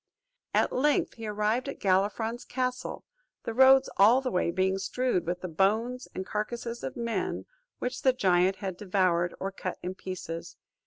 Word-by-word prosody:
At - - +2
length 290 +3 +2
he 225 -1 -7
arrived 215 +5 0
at - - -7
Galifron's 205 +5 +1
castle, 255 0 -3 0.4
the 230 - -3
roads 265 +2 +7
all 220 +6 +7
the 265 -1 -3
way 180 -2 +1
being 190 +2 +1
strewed 195 -2 -1
with 180 +1 -2
the 185 - -3
bones 220 +9 0
and 185 - -3
carcasses 235 +3 -4
of 260 - -5
men 230 -5 -2 0.3
which 250 +1 -4
the 260 - +5
giant 190 -5 +3
had 190 -2 -5
devoured, 180 -3 +1
or 195 - -3
cut 185 -1 -5
in 180 +1 -3
pieces. 180 -3 -7
210 Hz, 165 wpm, -28 LUFS, 185-250 Hz, 0.4 s, roads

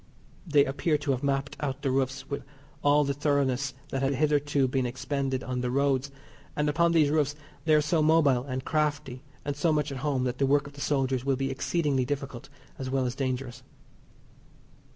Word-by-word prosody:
They 145 -3 +5
appear 150 +3 0
to 145 -1 -1
have 130 -1 -1
mapped 140 -1 -1
out 140 -3 -3
the 135 - +1
roofs 135 0 -1
with 140 - -4 0.4
all 145 +1 +5
the 140 0 0
thoroughness 140 -2 0
that 135 - -2
had 135 0 +1
hitherto 145 -1 +2
been 130 -1 0
expended 135 +1 -2
on 125 -1 -3
the 125 - -1
roads, 140 +1 +1 0.5
and 150 0 0
upon 170 +3 +3
these 155 -4 +4
roofs 150 -2 +1 0.3
they 155 -1 +5
are 150 - +5
so 155 +2 +1
mobile 150 -5 +4
and 130 -1 -4
crafty 145 -4 -1 0.2
and 145 -1 -2
so 155 +3 +2
much 150 -1 0
at 135 - -5
home 135 -2 0
that 125 -1 -2
the 135 - +3
work 145 +1 +3
of 140 - -10
the 140 - -10
soldiers 135 -3 0
will 135 0 +1
be 135 +1 -2
exceedingly 140 -1 0
difficult 135 -2 -5 0.3
as 130 -1 -4
well 130 -1 +1
as 125 - -1
dangerous. 130 -2 -3
140 Hz, 195 wpm, -28 LUFS, 130-145 Hz, 0.5 s, They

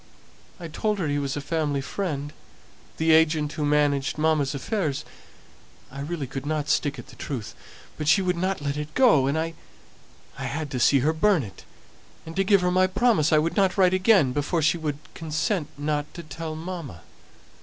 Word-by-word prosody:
I 170 - -6
told 210 +6 -1
her 175 -5 -1
he 145 0 0
was 140 0 -2
a - - -3
family 145 -1 -1
friend, 145 -2 -4 0.6
the 160 0 +2
agent 155 -2 +3
who 150 0 -4
managed 145 -1 +1
mamma's 150 -3 +1
affairs 150 - -2 0.9
I 135 - -8
really 150 +1 -3
could 135 +1 -6
not 150 0 -2
stick 145 -1 +1
at 120 - -10
the 125 - -13
truth; 125 -4 -5 0.5
but 150 - -3
she 160 - +5
wouldn't 185 -2 -1
let 140 0 -2
it 150 0 -6
go; 220 - +5
and 140 +3 0
I 165 +1 -2 0.8
had 150 0 -4
to 125 - -2
see 135 +2 +4
her 160 - +3
burn 170 -1 +3
it, 95 -4 -11 0.6
and 160 0 -8
to 195 - +2
give 195 0 +4
her 180 0 +1
my 185 +1 +4
promise 190 -5 +2
I 155 - +5
wouldn't 185 +5 +1
write 185 -1 +4
again 185 - +4
before 145 +4 -1
she 155 +3 +2
would 150 -3 -3 0.2
consent 160 +1 -2
not 150 0 -2
to 170 - -7
tell 155 +1 -6
mamma. 160 - -7
155 Hz, 185 wpm, -25 LUFS, 145-175 Hz, 0.9 s, she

